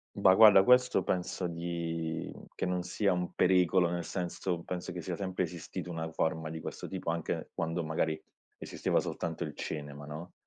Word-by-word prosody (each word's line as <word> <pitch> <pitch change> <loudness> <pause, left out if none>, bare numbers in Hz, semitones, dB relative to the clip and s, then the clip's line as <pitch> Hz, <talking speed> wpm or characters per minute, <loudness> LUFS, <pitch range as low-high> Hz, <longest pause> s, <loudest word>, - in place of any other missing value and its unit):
Bah, 95 - +6
guarda 105 -2 +9
questo 125 -5 +5
penso 90 0 -1
di 85 -1 -3 0.3
che - - -2
non 90 -1 -1
sia 100 +2 +1
un 90 0 -2
pericolo, 90 -1 +4
nel 85 0 -2
senso 90 0 -3
penso 90 0 -4
che 90 - -5
sia 80 - -3
sempre 95 -2 -2
esistito 90 0 -6
una 80 -1 -4
forma 80 0 -1
di 80 0 -5
questo - - -6
tipo 95 -3 -2
anche 85 -1 -3
quando 80 +1 -1
magari 80 0 -1 0.4
esisteva - - 0
soltanto 80 +1 -3
il 75 - -7
cinema, 75 -1 -5
no? 80 +4 -8
85 Hz, 170 wpm, -31 LUFS, 80-90 Hz, 0.4 s, guarda